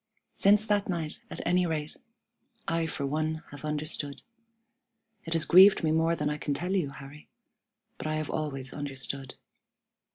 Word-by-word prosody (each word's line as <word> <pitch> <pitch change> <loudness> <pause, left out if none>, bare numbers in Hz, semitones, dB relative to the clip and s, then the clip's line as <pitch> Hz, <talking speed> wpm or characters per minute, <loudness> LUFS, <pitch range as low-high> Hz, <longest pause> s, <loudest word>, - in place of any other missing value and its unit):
Since 205 +2 +4
that 205 -2 +1
night, 165 -4 -3
at - - -7
any 180 +1 +2
rate, 155 -2 -3 0.7
I 165 -1 0
for 145 -2 -3
one 155 +3 -2
have 145 0 -10
understood. 150 -1 -2 1.0
It 165 - -3
has 165 -1 +1
grieved 190 +2 +7
me 155 - +2
more 165 +1 +2
than 150 -2 -2
I 150 0 -2
can 145 -1 -2
tell 180 +6 -1
you, 170 -7 0
Harry, 140 +2 -12 0.7
but - - -4
I 155 - -1
have 155 -1 -3
always 135 -4 -3
understood. 135 -2 -3
155 Hz, 160 wpm, -29 LUFS, 145-170 Hz, 1.0 s, grieved